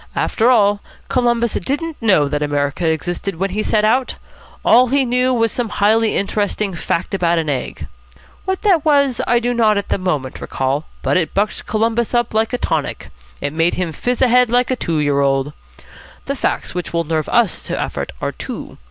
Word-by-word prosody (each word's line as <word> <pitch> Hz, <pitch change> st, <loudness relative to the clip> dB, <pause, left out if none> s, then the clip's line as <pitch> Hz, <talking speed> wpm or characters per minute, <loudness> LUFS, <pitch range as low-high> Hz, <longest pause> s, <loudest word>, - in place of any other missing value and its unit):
After 230 Hz, +2 st, +1 dB
all, 205 Hz, -4 st, +3 dB, 0.3 s
Columbus 235 Hz, -2 st, +1 dB
didn't 295 Hz, -, -2 dB
know 190 Hz, -10 st, +3 dB
that 145 Hz, +1 st, -2 dB
America 145 Hz, +3 st, 0 dB
existed 175 Hz, +4 st, -2 dB
when 190 Hz, +3 st, -2 dB
he 210 Hz, +3 st, -1 dB
set 215 Hz, 0 st, +1 dB
out. 250 Hz, +4 st, +1 dB, 0.5 s
All 250 Hz, +2 st, +6 dB
he 270 Hz, +2 st, +2 dB
knew 250 Hz, +1 st, +1 dB
was 230 Hz, -3 st, +1 dB
some 240 Hz, -3 st, -2 dB
highly 220 Hz, +2 st, +2 dB
interesting 205 Hz, 0 st, -1 dB
fact 170 Hz, +2 st, -2 dB
about 170 Hz, -3 st, +1 dB
an 160 Hz, -2 st, -1 dB
egg. 135 Hz, -3 st, -3 dB, 0.6 s
What 380 Hz, 0 st, -2 dB
that 370 Hz, -8 st, +3 dB
was, 280 Hz, -5 st, +3 dB
I 240 Hz, -, +4 dB
do 245 Hz, +1 st, 0 dB
not 220 Hz, -3 st, +3 dB
at 200 Hz, -, -3 dB
the -, -, 0 dB
moment 150 Hz, -8 st, -2 dB
recall, 135 Hz, +3 st, -2 dB, 0.2 s
but -, -, +2 dB
it 170 Hz, -3 st, -1 dB
bucked 205 Hz, +2 st, -1 dB
Columbus 225 Hz, +2 st, 0 dB
up 240 Hz, -2 st, +1 dB
like 220 Hz, 0 st, +1 dB
a 245 Hz, -, -1 dB
tonic. -, -, -3 dB, 0.3 s
It 145 Hz, -, -3 dB
made 165 Hz, +2 st, +1 dB
him 180 Hz, -3 st, -2 dB
fizz 245 Hz, -, -1 dB
ahead 250 Hz, -1 st, +4 dB
like 245 Hz, +2 st, +2 dB
a -, -, +2 dB
two 165 Hz, -9 st, -2 dB
year 145 Hz, -2 st, +1 dB
old. 135 Hz, +1 st, +1 dB, 0.7 s
The 280 Hz, -, -2 dB
facts -, -, -2 dB
which 180 Hz, -1 st, -5 dB
will 170 Hz, 0 st, +1 dB
nerve 155 Hz, -1 st, -2 dB
us 235 Hz, -7 st, +2 dB
to -, -, -3 dB
effort -, -, -3 dB
are -, -, -2 dB
two. -, -, -8 dB
210 Hz, 195 wpm, -18 LUFS, 165-245 Hz, 0.7 s, All